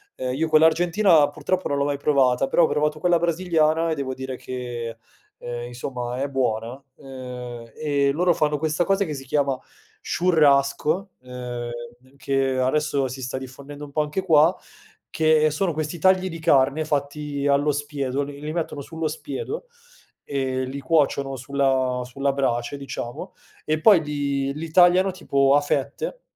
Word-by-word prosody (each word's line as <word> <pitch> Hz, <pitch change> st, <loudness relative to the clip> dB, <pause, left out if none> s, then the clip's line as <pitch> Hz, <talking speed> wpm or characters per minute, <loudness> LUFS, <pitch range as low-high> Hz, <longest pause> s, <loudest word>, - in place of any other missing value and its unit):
ehm, 125 Hz, 0 st, -3 dB
io 160 Hz, +4 st, 0 dB
quella 155 Hz, 0 st, +6 dB
argentina 165 Hz, -1 st, +4 dB
purtroppo 185 Hz, +5 st, -2 dB
non 140 Hz, -, 0 dB
l'ho 140 Hz, -, +1 dB
mai 145 Hz, -1 st, -1 dB
provata, 135 Hz, -2 st, +2 dB
però 170 Hz, -, +3 dB
ho -, -, +5 dB
provato 150 Hz, +1 st, 0 dB
quella 175 Hz, +1 st, +3 dB
brasiliana 165 Hz, -1 st, +1 dB
e -, -, 0 dB
devo 135 Hz, -3 st, -3 dB
dire 130 Hz, 0 st, -5 dB
che, 120 Hz, -3 st, -6 dB, 0.4 s
ehm, 120 Hz, 0 st, -6 dB
insomma, 125 Hz, 0 st, -5 dB
è 140 Hz, -, 0 dB
buona, 115 Hz, -4 st, -1 dB, 0.3 s
uhm, 125 Hz, -3 st, -8 dB
e 140 Hz, -2 st, +1 dB
loro 175 Hz, +4 st, +2 dB
fanno 150 Hz, -2 st, +1 dB
questa 155 Hz, +3 st, 0 dB
cosa 195 Hz, +1 st, +2 dB
che 155 Hz, -, -4 dB
si 135 Hz, -2 st, -7 dB
chiama 140 Hz, 0 st, +1 dB, 0.5 s
"churrasco", 155 Hz, +2 st, +2 dB
uhm, 125 Hz, -1 st, -6 dB, 0.5 s
che 135 Hz, -1 st, 0 dB
adesso 140 Hz, +1 st, +1 dB
si 130 Hz, +1 st, -7 dB
sta 125 Hz, +1 st, -4 dB
diffondendo 140 Hz, +3 st, -9 dB
un 145 Hz, -, -9 dB
po' 150 Hz, -, +1 dB
anche 150 Hz, +5 st, -2 dB
qua, 160 Hz, 0 st, +5 dB, 0.6 s
che 155 Hz, -1 st, +3 dB
sono 170 Hz, +3 st, 0 dB
questi 155 Hz, +2 st, -4 dB
tagli 185 Hz, +1 st, +3 dB
di 165 Hz, -1 st, -7 dB
carne 145 Hz, -1 st, +3 dB
fatti 145 Hz, -1 st, -2 dB
allo 145 Hz, +1 st, +3 dB
spiedo, 145 Hz, -2 st, -2 dB
li 140 Hz, 0 st, -8 dB
li 150 Hz, +1 st, -5 dB
mettono 160 Hz, -3 st, -3 dB
sullo 160 Hz, +2 st, -4 dB
spiedo 450 Hz, -, -5 dB, 0.6 s
e 130 Hz, -2 st, -2 dB
li 135 Hz, +2 st, -6 dB
cuociono 140 Hz, -2 st, +1 dB
sulla 130 Hz, -1 st, 0 dB
sulla 135 Hz, +3 st, -1 dB
brace, 135 Hz, -1 st, -1 dB
diciamo, 135 Hz, -3 st, -7 dB, 0.3 s
e 155 Hz, 0 st, 0 dB
poi 190 Hz, +1 st, +6 dB
li 140 Hz, -2 st, -2 dB
li 160 Hz, +2 st, -6 dB
tagliano 180 Hz, +2 st, +5 dB
tipo 140 Hz, -6 st, +2 dB
a 145 Hz, -, +4 dB
fette 460 Hz, -, -2 dB
145 Hz, 160 wpm, -23 LUFS, 130-160 Hz, 0.6 s, quella